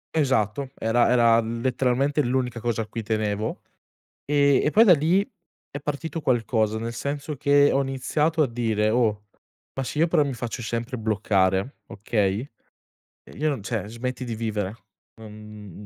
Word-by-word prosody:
Esatto, 130 -3 +1
era 115 +2 +2
era 115 -2 +5
letteralmente 125 +5 0
l'unica 125 -2 -1
cosa 115 -1 -1
a - - -9
cui 115 - -5
tenevo. 110 0 -2 0.6
E 140 -1 +3
e - - +2
poi 215 +8 +6
da 190 -6 +7
lì, 170 +7 +2 0.4
è 145 - -5
partito 150 +3 -4
qualcosa 115 -4 +1
nel 115 +1 -4
senso 145 +4 -4
che 145 0 +4
ho 135 - +2
iniziato 150 +4 0
a - - +1
dire: 110 -2 0
"Oh, 110 -3 +1 0.5
ma 135 - -3
se 130 - -6
io 165 - +4
però 160 -3 +3
mi 135 -3 -3
faccio 120 +1 -5
sempre 115 +3 -3
bloccare, 100 +1 0
okay 105 +3 -1 0.7
e - - -17
io 155 +1 +1
non 135 -8 -3
cioè, 105 -1 -3
smetti 125 +3 -5
di 120 - -4
vivere, 105 -3 -3 0.5
non 105 -2 -11
120 Hz, 160 wpm, -24 LUFS, 110-140 Hz, 0.7 s, da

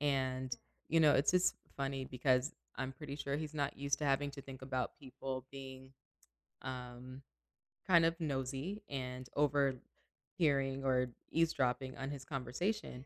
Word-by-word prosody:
and, 130 -3 +1 0.3
you 165 +1 +5
know, 150 -2 +8
it's 140 - +5
just 180 0 +4 0.2
funny 135 -1 -1
because 130 +2 +2 0.2
I'm 130 0 -2
pretty 140 +1 -6
sure 140 -1 -1
he's 155 0 -4
not 145 -2 0
used 140 0 +1
to - - 0
having 140 0 +2
to 140 -1 -7
think 135 -1 -9
about 130 -2 -2
people 130 -1 -5
being, 130 -1 -8 0.7
um, 130 0 -6 0.7
kind 170 -3 +7
of 165 +1 +2
nosy 145 +7 -2
and 130 -2 -4
overhearing 140 0 +1
or 125 -2 +2 0.2
eavesdropping 130 -5 +2
on 135 +1 -3
his 140 -2 -5
conversation, 135 - -2
135 Hz, 145 wpm, -36 LUFS, 130-145 Hz, 0.7 s, know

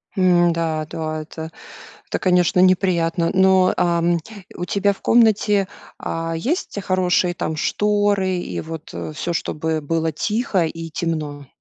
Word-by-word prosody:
М, 175 -3 +4
да 160 -2 -1
да, 155 -1 -4
это, 160 +1 -8 0.6
это - - -2
конечно, 180 -1 +3
неприятно. 175 -2 +2
Но, 190 -1 +4
ам, 170 0 +2 0.4
у 175 - -3
тебя 200 +2 +1
в 195 - -13
комнате, 210 -3 +3 0.3
а, 165 0 -3
есть, 250 - -2
хорошие, 180 -1 +1
там, 160 - -3
шторы 205 +1 +1
и 175 - -4
вот, 160 -1 -8
э, 155 - -5
всё, 170 +3 -3
чтобы 160 -1 -2
было 160 +2 -1
тихо 210 - 0
и 165 +1 -6
темно? 150 -3 -3
175 Hz, 140 wpm, -21 LUFS, 160-190 Hz, 0.6 s, М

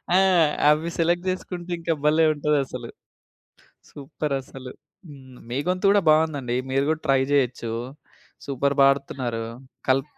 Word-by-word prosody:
ఆ! - - +6 0.5
అవి 155 +3 +2
సెలెక్ట్ 175 +2 +1
జేసుకుంటే 180 -1 -5
ఇంక 165 0 -2
భలే 155 +2 +4
ఉంటద‌స్స‌లు. 145 -2 -2 1.0
సూపర్ 145 0 -4
అసలు. 130 -1 -10 0.4
హ్మ్. 130 -3 -14
మీ 125 - -2
గొంతు 185 +2 +2
గూడా 205 0 +4
బావుందండి. 150 -6 +2 0.2
మీరు 135 +1 +2
గూడా 160 0 -1
ట్రై 135 -1 +4
జేయొచ్చు. 125 -4 0 0.7
సూపర్ 140 0 -1
పాడుతున్నారు. 130 -4 0 0.4
కల్ 130 +1 +3
140 Hz, 125 wpm, -24 LUFS, 130-160 Hz, 1.0 s, ఆ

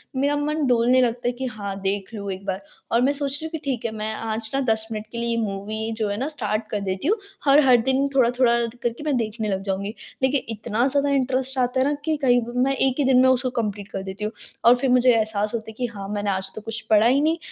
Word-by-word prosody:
मेरा 285 +2 +1
मन 300 +1 -1
डोलने 245 +1 +4
लगता 240 0 0
है 245 - +2
कि 260 +2 -5
हाँ 200 -5 -5
देख 195 +2 -2
लूँ 200 -2 -4
एक 190 +1 -7
बार। 190 0 -3 0.3
और 235 - +3
मैं 270 +3 +3
सोच 280 -1 -2
रही 290 +3 -4
हूँ 320 - -6
कि 325 - -3
ठीक 250 -4 -2
है 230 - -1
मैं 215 0 -3
आज 220 0 -3
न 275 - +1
10 220 -1 +1
मिनट 215 -1 -4
के 235 - -7
लिए 235 0 -1
ये 230 - 0
मूवी 215 +2 -3
जो 215 -2 -1
है 205 - -2
ना 265 - -2
स्टार्ट 220 -7 -2
कर - - -4
देती 190 +5 -3
हूँ। 430 +5 +3 0.3
हर-हर 275 -3 +6
दिन 265 +3 +1
थोड़ा-थोड़ा 245 -1 +4 0.3
करके 240 +3 -2
मैं 300 -3 0
देखने 220 -1 -2
लग 195 0 -2
जाऊँगी। 200 +2 -3 0.3
लेकिन 265 +1 +3
इतना 220 +2 -1
ज़्यादा 280 +1 +2
इंटरेस्ट 265 -1 +1
आता 250 +1 +1
है 260 - +3
ना 295 - +1
कि 315 - +1
कहीं 245 -2 +4 0.2
मैं 275 +1 +1
1 265 -1 +2
ही - - +3
दिन 255 -1 +5
में 260 - +5
उसको 255 0 +2
कंप्लीट 210 -5 -3
कर 190 - -4
देती 195 +2 -6
हूँ 215 - -1 0.3
और 240 +1 +8
फिर 255 +2 -1
मुझे 250 0 +5
एहसास 215 -1 +1
होता 220 -1 -4
है 220 - -9
कि 250 - -1
हाँ 195 -1 -6
मैंने 205 0 -2
आज 190 0 -1
तो 215 - -6
कुछ 225 0 -5
पढ़ा 215 +1 +5
ही 265 +4 +3
नहीं। 320 +2 +2
235 Hz, 265 wpm, -23 LUFS, 215-265 Hz, 0.3 s, और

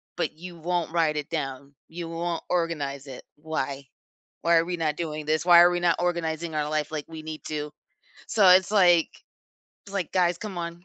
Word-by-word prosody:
but - - -1
you 175 +2 -10
won't 175 0 -2
write 160 -3 +2
it 150 - -4
down. 140 -3 -5
You 170 0 -6
won't 165 0 -3
organize 150 -6 -2
it. 130 - -10
Why? 140 -3 -4 0.5
Why 170 0 +3
are 165 - +3
we 175 0 -3
not 155 -2 0
doing 155 -3 -4
this? 155 +2 0
Why 175 -1 +8
are 175 +1 +6
we 175 0 -1
not 170 -1 +3
organizing 170 -2 -2
our 150 0 -1
life 155 -1 -1
like 150 -2 -4
we 160 -1 -8
need 155 0 -7
to?" 150 -1 -4 0.6
So, 200 -4 +5
it's, 185 +2 +6
like 175 -5 +3 0.6
it's 200 - -12
like, 185 -5 -2
"Guys, 175 -2 +2
come 195 -5 -6
on, 170 +1 -6
165 Hz, 200 wpm, -26 LUFS, 150-175 Hz, 0.6 s, Why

